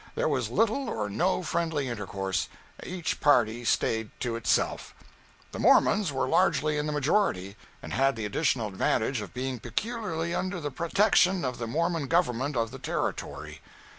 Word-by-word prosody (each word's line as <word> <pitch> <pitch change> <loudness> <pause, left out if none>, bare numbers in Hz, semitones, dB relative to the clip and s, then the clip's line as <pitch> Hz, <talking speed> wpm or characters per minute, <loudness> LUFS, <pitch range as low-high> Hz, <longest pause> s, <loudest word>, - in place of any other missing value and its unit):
There - - +1
was 130 -7 0
little 225 - +1
or 105 - -3
no 180 - +1
friendly 160 -5 -1
intercourse; 95 -4 -3 0.3
each 180 -3 -3
party 120 -5 +3
staid 110 -1 +1
to 120 -2 -1
itself. 115 - 0 0.6
The - - -6
Mormons 200 -7 +4
were 130 -1 -1
largely 150 +3 +2
in 150 - -2
the - - -1
majority, 145 - 0 0.3
and - - -6
had 135 -1 +2
the 110 -2 -4
additional 115 0 0
advantage 110 +5 0
of 100 -4 -8
being 130 +1 -4
peculiarly 185 - -3
under 185 0 -2
the 145 -2 -4
protection 185 +1 +3
of 125 -1 -3
the 115 - -3
Mormon 165 +3 -1
government 145 -5 +1
of 115 -1 0
the 135 - -9
Territory. 75 - -4
135 Hz, 160 wpm, -28 LUFS, 115-170 Hz, 0.6 s, Mormons